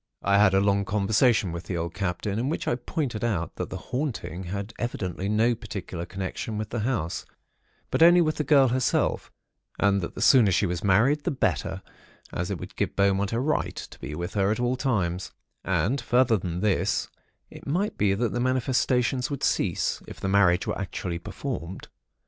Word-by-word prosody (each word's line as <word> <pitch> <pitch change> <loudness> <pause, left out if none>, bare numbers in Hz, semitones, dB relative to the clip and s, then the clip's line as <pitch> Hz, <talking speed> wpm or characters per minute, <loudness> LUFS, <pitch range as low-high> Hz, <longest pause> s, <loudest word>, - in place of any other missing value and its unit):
"I 100 0 +4
had 100 -2 +5
a - - +5
long 100 0 +2
conversation 105 +1 +2
with 85 0 -6
the 90 - -3
old 85 0 -3
Captain, 100 +2 -2
in 130 +4 -1
which 160 - -3
I - - +2
pointed 120 -2 -3
out 100 -8 -1
that - - -3
the - - -5
'haunting' 125 - -4
had 100 +4 -5
evidently 95 -5 -3
no 110 +3 +3
particular 100 -6 -6
connection 95 +4 -4
with 105 -1 -4
the 120 - -2
house, 105 -8 -1 0.7
but - - 0
only 175 +2 +8
with 155 -2 +1
the 150 - 0
girl 135 -2 +5
herself, 130 +1 0 0.5
and 100 -1 +2
that 85 - -5
the - - -6
sooner 120 -8 +6
she 95 - +2
was 90 -2 -3
married, 120 +10 +3
the - - 0
better, 140 -5 -1 0.5
as - - -2
it - - -2
would - - -9
give - - -2
Beaumont 100 0 +2
a 115 - 0
right 150 +4 0
to - - -9
be 75 +3 -6
with 85 +2 -4
her 100 -1 +2
at 110 - 0
all 125 +1 +1
times; 95 -9 -1 0.3
and 130 +7 0
further 120 -1 +3
than 90 -3 -3
this, 105 -3 +1 0.4
it - - -12
might 185 +9 0
be 100 -2 +2
that 115 +3 -1
the 120 - -1
manifestations 125 0 +1
would 140 -2 -4
cease, - - 0
if - - -10
the - - -3
marriage 95 -2 +4
were - - -2
actually 90 -2 -4
performed. 95 -1 -6
105 Hz, 195 wpm, -26 LUFS, 95-125 Hz, 0.7 s, only